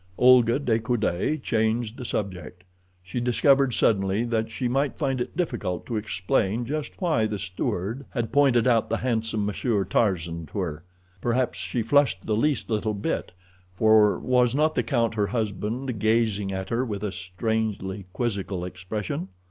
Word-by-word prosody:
Olga 125 -1 +6
de 120 -6 +1
Coude 115 - -1
changed 110 0 0
the 125 - -7
subject. 90 -4 -4 0.4
She 95 +6 -4
discovered 135 +2 +3
suddenly 100 0 +2
that 115 -2 -1
she 115 +3 -2
might 135 +3 0
find 135 -4 -1
it - - -5
difficult 120 - -2
to 120 - -4
explain 105 +2 0
just 150 +3 -4
why 155 - +2
the 105 -1 -3
steward 100 +5 -3
had 120 -3 -3
pointed 135 -5 +4
out 115 -3 +3
the 115 - +1
handsome 110 -4 -1
Monsieur 105 0 0
Tarzan 85 -7 0
to - - -9
her. 80 -5 -3 0.4
Perhaps 120 -6 0
she 95 +6 -2
flushed 135 -5 +2
the 110 - +1
least 145 +5 +1
little 110 -1 -1
bit, 100 - -2 0.4
for 110 0 +5
was 125 -1 +2
not 155 +2 +2
the - - +1
count, 120 -5 0
her 105 -2 0
husband, 110 +3 -2
gazing 110 -2 +1
at 95 0 -4
her 120 +2 0
with 105 -5 -4
a 105 - -1
strangely 95 +1 -3
quizzical 100 -5 -2
expression. 95 +1 -4
110 Hz, 160 wpm, -25 LUFS, 100-125 Hz, 0.4 s, Olga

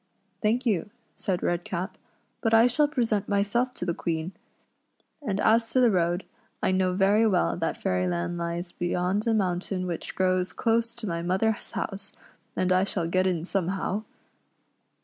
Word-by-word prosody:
" - - -44
Thank 235 +4 +1
you," 210 -2 +1 0.2
said 190 -4 -2
Redcap, 175 +2 -2 0.2
" - - -43
but 225 -1 +3
I 225 +1 +7
shall 270 +5 +4
present 230 -8 0
myself 205 +5 +1
to - - -4
the 170 - 0
Queen; 165 +1 -2 0.9
and 205 -8 -2
as 225 +1 +3
to 260 - +4
the 245 -3 +5
road, 175 0 +1 0.4
I - - +3
know 185 -1 +2
very 200 +4 +4
well 185 -4 +2
that 165 -2 -1
Fairyland 90 - -1
lies 170 +1 -3
beyond 180 +4 -1
a 230 - +3
mountain 185 -1 -1
which 175 -2 -5
grows 185 -1 +1
close 230 0 +1
to 235 - -7
my 170 -4 -2
mother's 190 +5 0
house, 200 0 -5 0.4
and 185 0 +1
I 185 +1 +4
shall 185 -4 -1
get 185 +2 +2
in 170 -3 -1
somehow." 195 +2 -1
190 Hz, 170 wpm, -27 LUFS, 175-220 Hz, 0.9 s, I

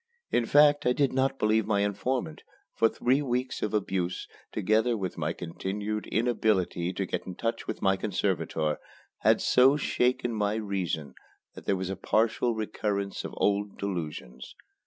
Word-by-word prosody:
In 115 - +2
fact 145 0 +5
I 125 - +4
did 140 0 +1
not 135 +1 +1
believe 110 -1 +2
my 100 -2 +2
informant; 105 -2 -2 0.3
for 115 - +3
three 130 +6 +1
weeks 130 -1 -2
of 105 - -1
abuse, 95 -4 -1 0.2
together 110 +4 +2
with 95 -3 -3
my 80 -1 -1
continued 100 +5 -4
inability 105 -6 +1
to 95 +1 -2
get - - -4
in 90 - -6
touch 115 +4 -3
with - - -4
my 95 0 +3
conservator, 85 -6 -1 0.4
had - - +4
so 135 +3 +5
shaken 125 -3 +1
my 105 -1 0
reason 90 -9 -3 0.4
that - - -11
there 100 - +2
was 95 0 -3
a - - -2
partial 115 +4 +1
recurrence 105 -2 -2
of - - -7
old 100 0 0
delusions. 80 -10 -5
105 Hz, 155 wpm, -28 LUFS, 95-120 Hz, 0.4 s, fact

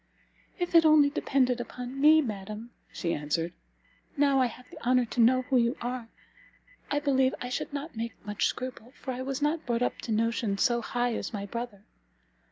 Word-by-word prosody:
"If 355 -2 -2
it 335 -1 +8
only 305 -2 +6
depended 255 -4 +1
upon 250 +3 -6
me, 310 +1 +7
madam," 215 +1 -6 0.2
she 170 -2 -2
answered, 165 +4 -2 0.6
"now 280 -1 +4
I 255 - +4
have 250 +1 -12
the - - -12
honour 250 0 +3
to 235 +1 -1
know 255 +3 +5
who 260 0 +1
you 235 +2 +2
are, 245 -1 -4 0.8
I 290 - +1
believe 265 -2 +2
I 250 - -4
should 250 - -3
not 285 0 -5
make 230 +1 -4
much 210 0 0
scruple, 255 -1 -6
for 260 - -4
I 250 - -5
was 270 +2 -3
not 310 +2 +1
brought 240 0 +1
up - - -1
to 230 - -5
notions 220 -2 +1
so 240 -2 +2
high 245 +1 -1
as - - -4
my 200 -1 -3
brother. 230 -1 -6
245 Hz, 190 wpm, -29 LUFS, 230-270 Hz, 0.8 s, it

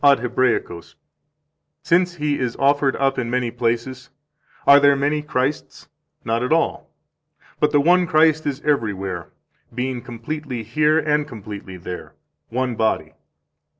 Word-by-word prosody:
10, 140 -1 +8
Ad 135 - -1
Hebraicos): 120 -9 -1 0.9
"Since 180 +1 +2
He 150 -3 -1
is 125 -2 -2
offered 140 0 +2
up 135 -1 0
in 120 -2 -2
many 125 -1 -1
places, 120 +3 -2 0.6
are 140 0 +8
there 140 0 +5
many 145 +2 0
Christs? 145 -1 -3 0.4
Not 115 +1 0
at 125 - -2
all. 165 +1 0 0.7
But 150 - +3
the 145 -1 +3
one 175 +3 +4
Christ 155 -1 +3
is 140 0 -3
everywhere, 100 - -2 0.5
being 125 0 -2
completely 125 +1 -6
here 150 +8 +2
and 150 -2 +1
completely 105 -6 -9
there, 90 0 -8 0.3
one 125 +1 -1
body. 110 -1 -1
130 Hz, 140 wpm, -21 LUFS, 115-150 Hz, 0.9 s, 10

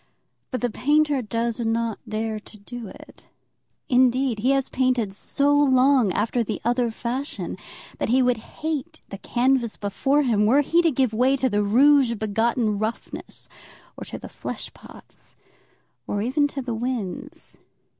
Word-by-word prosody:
But 255 - -3
the 245 -1 0
painter 295 +2 +2
does 230 +1 -2
not 225 -1 -1
dare 215 0 -2
to 215 - -16
do 235 +2 -8
it. - - -14 0.6
Indeed, 255 -2 +2
he 245 +5 +1
has 275 -1 +2
painted 255 -6 0
so 280 +7 0
long 265 -5 +4
after 230 +3 0
the 215 -1 -4
other 240 0 +1
fashion 245 +5 -4 0.4
that - - -1
he 255 +2 +4
would 250 -1 +2
hate 315 +6 -5
the 195 - -8
canvas 245 -1 0
before 270 +9 +1
him, 210 -5 +2
were 270 +6 +5
he 335 +4 +3
to 335 - +3
give 255 -4 +1
way 255 +4 +3
to 260 -1 +1
the 205 -2 +1
rouge 255 +4 +4
begotten 220 0 0
roughness 220 +2 -5 0.5
or - - -8
to - - -7
the - - -9
flesh - - -7
pots, - - -15 0.7
or 205 0 -1
even 285 +5 +2
to 275 -2 -6
the 245 -2 -3
winds. 225 -5 -5
245 Hz, 155 wpm, -24 LUFS, 220-270 Hz, 0.7 s, were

